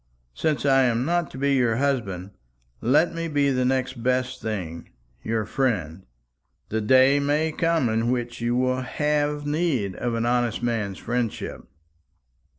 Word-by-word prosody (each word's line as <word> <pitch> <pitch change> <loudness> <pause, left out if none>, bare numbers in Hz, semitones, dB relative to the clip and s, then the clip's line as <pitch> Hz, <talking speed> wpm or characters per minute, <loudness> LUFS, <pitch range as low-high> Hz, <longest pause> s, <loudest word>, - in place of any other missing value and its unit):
Since 150 - -1
I 135 -1 +5
am 120 +1 +1
not 170 -1 0
to - - -10
be 140 +1 +1
your 120 -4 +2
husband, 110 -9 -1 0.5
let 150 +9 +3
me 165 0 -3
be 145 -3 +2
the 130 -1 +1
next 130 -1 -1
best 130 +1 0
thing 90 -7 -5 0.3
your 110 - -1
friend. 95 - -2 0.6
The 110 +1 -1
day 130 +5 +5
may 150 +3 +1
come 165 -4 +1
in 115 +1 0
which 120 -1 -2
you 120 +1 0
will 130 +1 +1
have 150 +2 -1
need 145 - 0
of 120 -1 -2
an 115 0 -1
honest 120 -1 0
man's 110 -5 -1
friendship." 120 -2 -3
125 Hz, 155 wpm, -24 LUFS, 115-140 Hz, 0.6 s, I